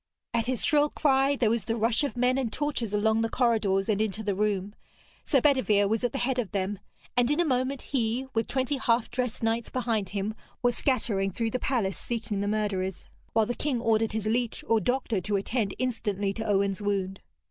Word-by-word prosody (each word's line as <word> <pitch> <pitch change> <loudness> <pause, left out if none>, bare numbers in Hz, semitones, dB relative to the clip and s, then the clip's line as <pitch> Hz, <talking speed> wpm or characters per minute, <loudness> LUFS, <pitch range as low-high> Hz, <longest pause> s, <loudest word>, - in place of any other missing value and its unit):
At 230 -1 0
his 255 -2 0
shrill 295 0 +4
cry 275 -1 +2
there 235 -5 +2
was 230 -4 -1
the 225 - -1
rush 230 +4 +2
of 280 -3 -2
men 250 +2 +2
and 240 -4 -1
torches 285 -8 -2
along 220 +2 +2
the 225 - 0
corridors 215 -6 +2
and 215 -2 +1
into 220 0 -2
the 205 -1 0
room. 205 0 -1 0.5
Sir 275 - +3
Bedevere 250 -8 +3
was 220 +3 0
at 245 - +1
the 275 - -3
head 260 0 0
of 225 -6 -1
them, 195 0 -1 0.4
and 245 0 +3
in 295 +3 +1
a 345 - +3
moment 260 -1 0
he, 245 -1 -1
with 225 0 0
twenty 265 +2 0
half 235 -2 +1
dressed 245 -2 -2
knights 225 +1 0
behind 230 -6 -1
him, 200 +1 -2 0.3
was 245 -1 +3
scattering 215 -7 +1
through 225 +4 -2
the 255 - -1
palace 225 -9 -1
seeking 225 -4 -3
the 205 - -1
murderers, 200 -3 -2 0.2
while 225 -1 +4
the 240 - -2
king 270 -1 -1
ordered 225 -1 +1
his 220 -1 -2
leech 235 +2 0
or 225 -1 +3
doctor 245 -5 0
to 205 +3 -1
attend 200 +1 -1
instantly 205 -6 -1
to 220 +2 -4
Owen's 200 -1 +1
wound. 195 -2 -2
225 Hz, 210 wpm, -28 LUFS, 205-250 Hz, 0.5 s, shrill